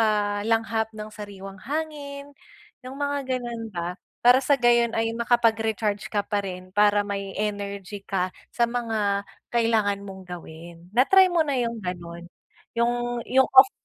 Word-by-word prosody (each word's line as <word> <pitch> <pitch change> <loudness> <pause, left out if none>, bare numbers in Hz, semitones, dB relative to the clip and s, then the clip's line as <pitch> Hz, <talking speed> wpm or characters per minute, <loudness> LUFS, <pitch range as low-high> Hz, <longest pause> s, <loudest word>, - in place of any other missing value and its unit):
makalanghap 220 +1 +1
ng 215 -1 -7
sariwang 195 -2 -9
hangin. 285 -2 -5 0.5
Iyung 260 +2 -8
mga 285 0 0 0.2
ganoon 235 -2 -5
ba, 175 -2 -4 0.2
para 250 +2 +6
sa 285 -1 +3
gayon 240 -1 +4
ay 225 0 0
makapag-recharge 225 -3 +1
ka 205 -1 -1
pa 205 -1 0
rin 185 0 -7
para 205 0 +4
may 200 -1 -3
energy 200 -1 -4
ka 185 -2 -2 0.2
sa 235 - +2
mga 220 -4 -1 0.3
kailangan 220 -4 +2
mong 190 -2 -9
gawin. 170 0 -10
Na-try 365 - +5
mo 330 -3 +2
na 285 - 0
iyung 235 -2 -1
ganoon? 175 -3 -6 0.5
Iyung, 240 0 0
iyung 265 +1 +5
off 265 +9 +9
220 Hz, 145 wpm, -25 LUFS, 200-240 Hz, 0.5 s, off